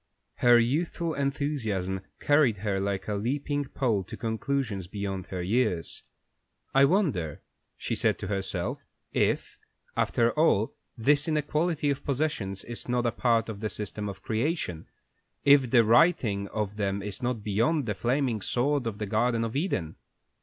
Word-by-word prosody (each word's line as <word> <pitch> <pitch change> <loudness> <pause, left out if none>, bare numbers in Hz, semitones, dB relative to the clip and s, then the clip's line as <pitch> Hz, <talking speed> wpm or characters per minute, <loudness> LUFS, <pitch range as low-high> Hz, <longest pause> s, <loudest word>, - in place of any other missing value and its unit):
Her 120 -1 +6
youthful 160 +7 0
enthusiasm 135 -10 -1 0.2
carried 145 -7 +3
her 100 -2 +1
like 95 -1 -2
a 105 - -1
leaping 140 +7 -1
pole 115 -7 0
to - - -8
conclusions 110 -4 -2
beyond 95 -1 -4
her 90 -2 -4
years. 105 -4 0 0.7
"I 135 +1 +6
wonder," 140 - 0 0.3
she - - -3
said - - +1
to - - -5
herself, 95 -1 -2 0.3
"if, - - 0 0.4
after 115 0 +2
all, 150 -9 +2 0.2
this 145 +6 +3
inequality 155 0 +1
of 140 - -4
possessions 135 -9 -1
is 120 +1 -4
not 125 0 +1
a 120 - +2
part 115 0 +2
of 110 -3 -6
the 110 0 -2
system 105 0 -4
of 95 -1 -9
creation, 115 - -2 0.6
if 140 -3 +6
the 120 -1 +6
righting 115 - +3
of 105 0 -3
them 100 -1 -1
is 105 +3 -4
not 120 -3 -2
beyond 115 +9 +1
the 105 - -1
flaming 120 +1 0
sword 130 +4 0
of 105 -3 -3
the 105 - -3
Garden 115 +3 +1
of 115 +1 -3
Eden? 115 - -1
115 Hz, 155 wpm, -28 LUFS, 100-140 Hz, 0.7 s, Her